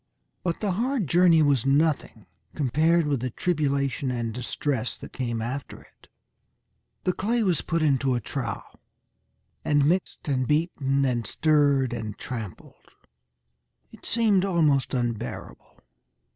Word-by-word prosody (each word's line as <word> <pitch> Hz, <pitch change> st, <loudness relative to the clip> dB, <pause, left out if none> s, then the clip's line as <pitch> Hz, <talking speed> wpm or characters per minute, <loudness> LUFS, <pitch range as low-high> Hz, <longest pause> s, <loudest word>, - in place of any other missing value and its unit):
But 170 Hz, -2 st, -2 dB
the 205 Hz, -3 st, 0 dB
hard 235 Hz, +3 st, 0 dB
journey 170 Hz, 0 st, +5 dB
was 140 Hz, -5 st, +2 dB
nothing 140 Hz, -6 st, +1 dB, 0.3 s
compared 155 Hz, +5 st, +2 dB
with 145 Hz, -3 st, 0 dB
the 130 Hz, +2 st, -2 dB
tribulation 140 Hz, -3 st, -1 dB
and 120 Hz, -3 st, -2 dB
distress 125 Hz, +1 st, -2 dB
that -, -, -11 dB
came 120 Hz, -3 st, -3 dB
after 130 Hz, +4 st, -5 dB
it. -, -, -22 dB, 1.0 s
The 185 Hz, -, +1 dB
clay 230 Hz, +5 st, 0 dB
was 180 Hz, -5 st, +1 dB
put 165 Hz, -1 st, -1 dB
into 135 Hz, -3 st, +2 dB
a -, -, 0 dB
trough 105 Hz, -, -5 dB, 0.9 s
and 145 Hz, -1 st, +3 dB
mixed 175 Hz, +2 st, -1 dB
and 130 Hz, -3 st, 0 dB
beaten 140 Hz, -3 st, +1 dB
and 120 Hz, -3 st, -1 dB
stirred 145 Hz, -5 st, +2 dB
and 110 Hz, -3 st, -5 dB
trampled. 110 Hz, -, -8 dB, 1.0 s
It -, -, -16 dB
seemed 215 Hz, -5 st, +3 dB
almost 155 Hz, -8 st, +2 dB
unbearable. 120 Hz, -2 st, -5 dB
140 Hz, 130 wpm, -26 LUFS, 125-170 Hz, 1.0 s, journey